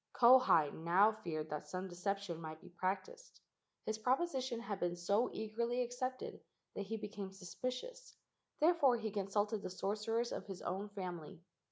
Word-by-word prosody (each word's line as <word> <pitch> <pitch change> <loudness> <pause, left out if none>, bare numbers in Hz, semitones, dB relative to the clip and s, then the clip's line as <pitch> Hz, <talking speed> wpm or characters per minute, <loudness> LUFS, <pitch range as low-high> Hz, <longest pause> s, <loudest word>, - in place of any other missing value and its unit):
Kauhi 240 - +7
now 180 +6 +4
feared 160 -8 -4
that 150 0 -4
some 185 +5 -3
deception 185 -1 -2
might 155 -1 -6
be 185 - -13
practised. 200 - -3 0.5
His 220 0 -2
proposition 260 -1 +1
had 205 -4 -4
been 175 0 0
so 200 +7 +2
eagerly 235 +3 -1
accepted 255 +1 -4 0.3
that 200 - -4
he 225 +2 -2
became 205 -2 -5
suspicious; 255 - -5 0.4
therefore 305 -6 +5
he 220 -2 -3
consulted 205 +1 0
the - - -4
sorcerers 215 +5 -1
of - - -4
his 190 -3 -7
own 195 +3 -2
family. 175 -5 -6
205 Hz, 150 wpm, -37 LUFS, 180-240 Hz, 0.5 s, Kauhi